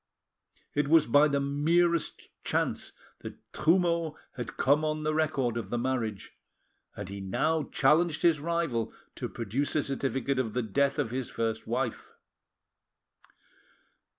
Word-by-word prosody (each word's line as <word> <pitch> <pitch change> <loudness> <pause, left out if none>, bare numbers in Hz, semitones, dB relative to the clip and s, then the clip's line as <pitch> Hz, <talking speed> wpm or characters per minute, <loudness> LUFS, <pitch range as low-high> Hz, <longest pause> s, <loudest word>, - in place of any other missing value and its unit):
It 145 -1 +1
was 160 +1 +6
by 145 +5 +5
the 140 -1 +1
merest 160 +4 +1
chance - - -1 0.3
that - - -8 0.2
Trumeau 170 -1 +2 0.2
had 120 -3 -6
come 145 +3 +3
on 155 0 -1
the 155 0 0
record 140 -7 0
of 110 -5 -4
the 120 - -1
marriage, 120 -5 -2 0.6
and 105 - -6
he 100 +1 -7
now 155 +11 0
challenged 155 +3 +3
his 165 -3 +4
rival 165 -7 -1 0.2
to - - -5
produce 120 +7 -2
a 150 - +2
certificate 135 0 -1
of 115 -4 -1
the 125 - +1
death 140 +6 +1
of 110 - -1
his 130 0 -3
first 115 -1 -2
wife. 120 0 -3
140 Hz, 140 wpm, -29 LUFS, 120-155 Hz, 0.6 s, was